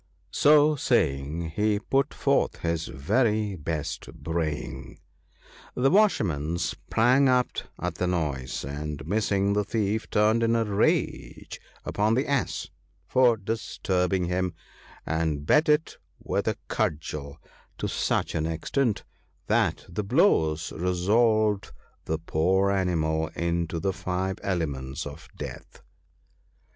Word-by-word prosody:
" - - -39
So 150 +1 +7
saying, 80 - 0
he 105 +4 +1
put 135 +7 0
forth - - 0
his 85 -1 -1
very 105 - +1
best 80 -2 -4
braying. 75 -6 -4 0.8
The 135 +2 +3
Washerman 85 - +2
sprang 125 +9 +2
up 125 -1 +3 0.3
at - - -2
the 90 - +2
noise, 75 -9 -2
and 75 0 -5
missing 100 +1 +1
the 105 0 +1
thief, 110 0 -1
turned 110 +2 +3
in 115 0 +2
a 115 -1 +2
rage 105 0 -1 0.2
upon 105 +2 +1
the 130 - 0
Ass 140 -2 -1 0.4
for 125 -3 +4
disturbing 95 -4 -1
him, 90 -1 -1 0.5
and 80 -2 -1
beat 150 - +4
it 150 +1 +1 0.2
with - - -2
a - - 0
cudgel 75 -1 -2 0.4
to - - -2
such - - 0
an 80 0 -1
extent 105 - -1 0.4
that - - +1
the 105 - -3
blows 100 - +2
resolved 105 +4 +1 0.3
the 80 - -1
poor 95 +5 +1
animal 80 -5 0
into 85 -1 -1
the 95 +2 -1
five 95 +1 -3
elements 75 -6 -3
of 75 +3 -9
death. - - -9
95 Hz, 120 wpm, -26 LUFS, 80-110 Hz, 0.8 s, So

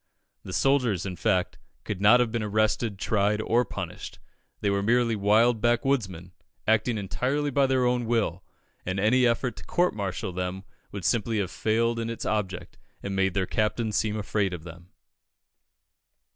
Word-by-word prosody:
The - - -9
soldiers, 115 -2 +1
in 95 -2 -4
fact, 95 -2 0 0.2
could 100 -2 -5
not 110 +5 +7
have 120 -2 +1
been 115 -1 -1
arrested, 110 0 0
tried, 105 +1 +1
or 115 +3 +2
punished; - - -7 0.4
they 100 - 0
were 100 0 +1
merely 115 +2 +2
wild 110 +3 +3
backwoodsmen, 120 - 0 0.3
"acting 110 +1 +2
entirely 130 +9 -1
by 140 0 +3
their 130 -1 +2
own 125 -1 +1
will, 105 -6 0 0.4
and 95 +2 -2
any 125 +5 +4
effort 120 +1 0
to - - -9
court 180 +1 +1
martial 95 -2 -3
them 90 +1 -4 0.3
would 100 -3 -6
simply 115 -1 +1
have 95 -3 -1
failed 115 +1 0
in 115 0 -3
its 115 - -5
object, 95 -4 -3 0.2
and 100 -1 -3
made 95 -1 +1
their 95 -2 +1
Captain 110 +3 -1
seem 105 +1 0
afraid 100 -3 -1
of 80 - -10
them." 85 +1 -12
110 Hz, 165 wpm, -26 LUFS, 95-120 Hz, 0.4 s, not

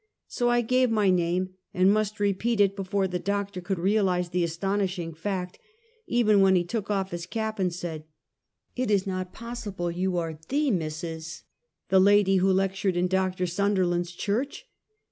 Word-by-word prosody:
So 240 -1 0
I 240 0 +3
gave 255 +2 +2
my 210 -4 +3
name, 180 +1 +1 0.3
and 185 +2 +5
must 215 0 -1
repeat 205 +3 0
it 200 -1 +4
before 195 0 -1
the 180 -1 -3
Doctor 200 0 -2
could 190 +2 -2
realize 185 -1 +1
the 175 0 0
astounding 180 0 -2
fact; 180 +2 -4 0.5
even 215 -4 +3
then 190 -1 +5
he 175 - +3
took 210 +3 -4
off 195 -2 -1
his 170 0 -5
cap 220 +1 -3
and 185 -2 +1
said: 165 -3 -6 0.4
" - - -52
It 255 -2 -1
is 200 -2 +2
not 185 -1 -3
possible 220 -7 -5
you 180 +1 -1
are 165 -2 -3
the 285 0 +1
Mrs., 160 -2 -4 0.5
the 190 - +5
lady 195 0 +5
who 190 +1 +3
lectured 190 -1 0
in 175 - +2
Doctor 185 0 0
Sunderland's 180 -2 0
church!" 235 - -3
190 Hz, 170 wpm, -26 LUFS, 180-205 Hz, 0.5 s, and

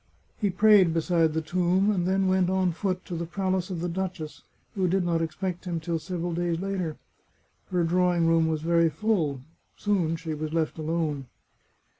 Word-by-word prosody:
He 205 - +1
prayed 190 -3 +5
beside 165 -1 +2
the 160 0 -1
tomb, 180 +4 +2
and 180 -4 0
then 190 +1 +2
went 185 -1 +2
on 185 -1 +2
foot 185 +1 -3
to 175 - -5
the 170 0 -3
palace 185 0 -1
of 175 -3 -4
the 175 - -1
duchess, 175 -3 -4 0.3
who 190 -2 +1
did 185 +1 +1
not 165 -1 +1
expect 180 +3 -3
him 170 -2 -2
till 165 0 -2
several 175 +1 -4
days 170 -1 -1
later. 185 -5 -3 0.7
Her 180 -2 +1
drawing 175 0 +2
room 165 0 +3
was 155 -1 -1
very 170 0 +3
full. 160 - 0 0.4
Soon 185 -6 +1
she 165 -1 -5
was 155 +1 -4
left 160 -1 -1
alone. 155 -4 -2
175 Hz, 180 wpm, -27 LUFS, 165-185 Hz, 0.7 s, prayed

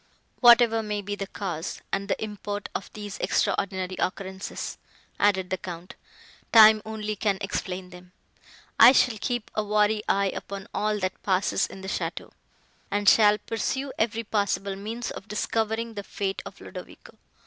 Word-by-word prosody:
"Whatever 235 -2 +7
may 210 -1 -3
be 205 +1 -4
the 195 -1 -5
cause 180 -5 -5
and 195 0 -1
the - - -1
import 205 -1 -5
of 195 - -5
these 205 -2 -7
extraordinary 190 -2 0
occurrences," 190 +1 -4 0.4
added 190 -3 +2
the 185 - -1
Count, 175 -2 -8 0.6
"time 220 -1 +8
only 215 -1 -3
can 200 -1 0
explain 185 -2 -4
them. 180 0 -13 0.7
I 255 - +10
shall 245 -4 +3
keep 240 -3 -2
a 215 - 0
wary 210 +1 +2
eye 200 -1 +2
upon 195 -1 -7
all 210 0 0
that 185 0 -3
passes 190 0 +1
in 190 - -11
the 190 - -7
château, - - -4 0.6
and 205 0 -1
shall 210 -1 +7
pursue 265 +5 -3
every 225 +1 0
possible 200 -2 -1
means 225 +5 -5
of 195 - -9
discovering 225 +2 -1
the 205 - -5
fate 195 -1 -3
of - - -12
Ludovico. - - -11
205 Hz, 155 wpm, -26 LUFS, 195-220 Hz, 0.7 s, I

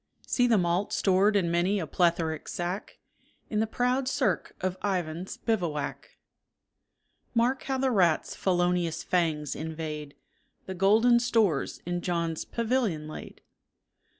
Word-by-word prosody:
See 245 -1 +2
the 230 -3 +4
malt 180 +2 0
stored 195 +2 +3
in 175 -4 +2
many 180 +4 +2
a 165 - -2
plethoric 165 -1 0
sack, 180 +4 -4 0.5
In 210 - +1
the 220 - +1
proud 250 +3 0
cirque 225 - 0
of 185 -1 -1
Ivan's 180 -3 -2
bivouac. 170 -10 -3 1.2
Mark 245 +3 +2
how 265 -1 -1
the 260 0 +1
rat's 180 -8 +2
felonious 175 -2 0
fangs 160 -5 0
invade 155 -2 -5 0.5
The 190 - -5
golden 220 +6 +4
stores 220 - +1
in 175 0 -2
John's 170 -2 -2
pavilion 225 -10 -1
laid. 155 - -9
180 Hz, 125 wpm, -28 LUFS, 165-220 Hz, 1.2 s, the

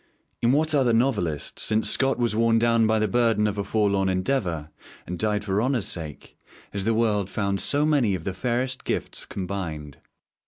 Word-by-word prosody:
In 120 - +3
what 155 +3 +2
other 130 -5 +3
novelist, 100 - -1
since 110 0 0
Scott 135 0 +1
was 120 -3 0
worn 115 0 +3
down 115 -1 +3
by 110 0 +2
the 110 0 +1
burden 115 0 +2
of 105 -1 -1
a - - 0
forlorn 100 -2 +1
endeavour, 90 - -1 0.3
and 90 -1 -6
died 105 -1 0
for 100 0 0
honour's 125 -4 0
sake, 80 -7 -5 0.4
has 100 -1 -2
the 115 0 +2
world 105 -4 +1
found 100 -1 -1
so 145 +7 +3
many 135 -10 +2
of 85 - -6
the 95 - -3
fairest 125 +5 -2
gifts - - -2
combined? 85 -7 -5
105 Hz, 185 wpm, -25 LUFS, 95-120 Hz, 0.4 s, In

